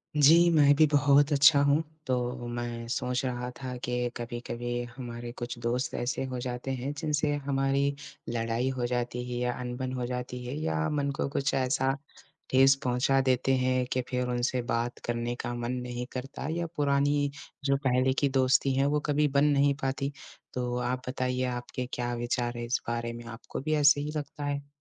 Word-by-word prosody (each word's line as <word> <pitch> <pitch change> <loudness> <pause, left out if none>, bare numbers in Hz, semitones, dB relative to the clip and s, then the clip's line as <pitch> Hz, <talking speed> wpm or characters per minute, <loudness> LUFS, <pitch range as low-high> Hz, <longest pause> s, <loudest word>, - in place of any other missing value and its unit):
जी, 165 +4 +7
मैं 145 -3 +6
भी 155 +2 +6
बहुत 145 0 +4
अच्छा 145 0 +7
हूँ, 145 +3 +3 0.2
तो 125 -1 -1
मैं 120 -1 -4
सोच 125 +2 -1
रहा 125 -1 -2
था 125 -1 -4
के 125 0 -1
कभी-कभी 120 0 -4
हमारे 120 -1 -6
कुछ 120 0 -5
दोस्त 120 +2 -1
ऐसे 120 +2 -1
हो 130 -1 -4
जाते 125 +1 -4
हैं, 130 +3 -3
जिनसे 150 -1 0
हमारी 140 +1 +1 0.3
लड़ाई 115 +2 0
हो 120 - 0
जाती 125 0 -2
है 120 - -2
या 125 0 0
अनबन 125 +1 -4
हो 125 -1 -2
जाती 125 0 -4
है 125 - -4
या 80 - 0
मन 140 -1 0
को - - 0
कुछ 140 0 0
ऐसा 130 0 +1 0.6
ठेस 135 +1 +6
पहुँचा 125 +2 +2
देते 130 0 +2
हैं, 130 0 +1
कि 130 0 0
फिर 125 -1 -1
उनसे 125 +1 0
बात 120 +1 -2
करने 120 0 -2
का 120 - -3
मन 120 0 -3
नहीं 125 0 -4
करता 135 +2 -5
या 170 +1 -2
पुरानी 145 0 +2 0.4
जो 140 -1 +3
पहले 130 +1 +3
की 140 - +4
दोस्ती 130 0 +3
है 135 +1 +3
वो 150 +1 +2
कभी 150 0 +2
बन 140 0 +2
नहीं 140 -1 +4
पाती। 135 +1 -1 0.4
तो 125 -1 -2
आप 125 +1 -1
बताइए 125 0 -1
आपके 125 0 -4
क्या 120 0 -2
विचार 120 0 -1
है 120 - -3
इस 120 - 0
बारे 115 0 -2
में? 120 - -8
आपको 115 0 -7
भी 155 +2 -1
ऐसे 145 -1 +5
ही 150 +1 -3
लगता 145 0 -5
है? 140 0 -3
125 Hz, 185 wpm, -29 LUFS, 120-140 Hz, 0.6 s, जी